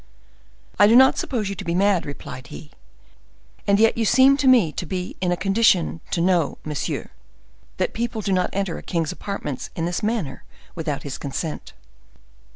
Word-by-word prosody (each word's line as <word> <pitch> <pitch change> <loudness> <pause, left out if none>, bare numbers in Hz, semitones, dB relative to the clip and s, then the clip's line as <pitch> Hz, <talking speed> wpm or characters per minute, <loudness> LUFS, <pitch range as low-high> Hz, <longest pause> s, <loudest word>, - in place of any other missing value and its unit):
"I 205 - +8
do 225 - +5
not 265 +1 +6
suppose 225 -6 -2
you 200 - -3
to - - -7
be 170 - -2
mad," 195 -3 +2
replied 130 -2 -8
he; 75 +1 -11 1.0
"and 200 0 +4
yet 225 +1 +3
you - - +2
seem 260 +5 +5
to 275 - +1
me 235 -11 +5
to 175 - -5
be 180 +1 -4
in 180 -1 +1
a 175 - 0
condition 195 -5 +2
to 170 - -1
know, 175 -4 +1
monsieur, 150 -2 -4 0.7
that - - -1
people 230 -1 -3
do 195 -1 -1
not 180 -1 +1
enter 195 -3 -2
a - - -10
king's 165 -3 -2
apartments 150 -10 -5
in 165 - -2
this 175 0 -2
manner 210 - -2 0.3
without 155 -4 -4
his 140 -2 -6
consent." 150 +3 -5
185 Hz, 180 wpm, -22 LUFS, 165-215 Hz, 1.0 s, I